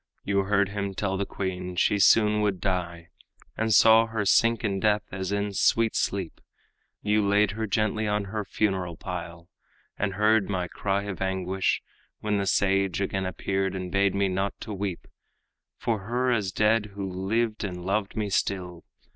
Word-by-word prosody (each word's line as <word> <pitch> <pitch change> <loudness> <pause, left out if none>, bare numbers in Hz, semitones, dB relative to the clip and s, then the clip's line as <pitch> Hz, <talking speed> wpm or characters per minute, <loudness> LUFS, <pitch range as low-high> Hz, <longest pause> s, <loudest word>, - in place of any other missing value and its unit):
You 100 -1 +1
heard 100 0 +2
him 100 -1 -4
tell 95 -1 -1
the 100 +1 -2
queen 90 -2 -4
she 100 +3 +2
soon 105 +1 +5
would 100 -3 0
die, 85 -3 -3 0.5
And 110 0 -1
saw 110 +1 +6
her 110 -2 -2
sink 115 +4 +3
in 100 -3 0
death 105 0 +2
as 95 -1 -4
in 100 0 -1
sweet 115 +3 +2
sleep; 95 -4 -2 0.6
You 105 +1 +2
laid 100 0 +3
her 110 +1 -3
gently 110 +1 0
on 105 0 0
her 105 +2 -4
funeral 95 -5 -1
pile, 85 -3 -7 0.5
And 100 -2 -1
heard 105 0 +3
my 90 -3 -1
cry 100 +3 -2
of 100 -2 -6
anguish, 95 0 -1 0.4
when 105 -1 0
the 100 - -1
sage 95 -2 +2
Again 95 -1 -1
appeared 95 0 -2
and 90 -1 -5
bade 100 0 +2
me 100 0 +2
not 95 +1 -2
to 110 - -5
weep 95 -3 -4 0.7
For 115 -3 -1
her 120 +6 -1
as 105 -5 0
dead 105 +1 +1
who 100 -1 -3
lived 105 +5 -1
and 90 -3 -5
loved 100 +1 -1
me 105 -2 -2
still. 90 -3 -2
100 Hz, 170 wpm, -26 LUFS, 95-105 Hz, 0.7 s, saw